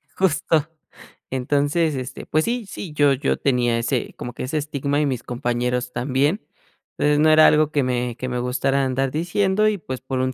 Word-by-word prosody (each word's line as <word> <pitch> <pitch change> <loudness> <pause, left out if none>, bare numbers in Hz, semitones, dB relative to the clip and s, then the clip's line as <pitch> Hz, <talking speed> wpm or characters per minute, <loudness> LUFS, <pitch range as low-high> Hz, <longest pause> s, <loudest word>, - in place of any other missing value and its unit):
Justo. 160 -4 +1 0.6
Entonces, 145 +4 +1
este, 130 0 -6
pues 155 +1 +1
sí, 240 -1 -2
sí, 180 -4 -7
yo 145 -2 +4
yo 135 +2 0
tenía 120 -3 +1
ese 120 +1 -2
como 120 - -6
que - - -6
ese 135 +5 -2
estigma, 145 -1 -1
y - - +2
mis 130 -4 -2
compañeros 125 0 -2
también, 135 - 0 0.6
eh, 150 0 +2
no 155 +1 +5
era 155 0 +7
algo 155 0 +3
que 145 -2 +1
me 125 -1 -1
que 130 - -4
me 125 -1 -2
gustara 135 +2 0
andar 130 0 -1
diciendo 190 +6 +1
y, 210 - -1
pues, 130 -8 -7
por 130 0 -3
un 130 0 0
140 Hz, 190 wpm, -22 LUFS, 125-155 Hz, 0.6 s, era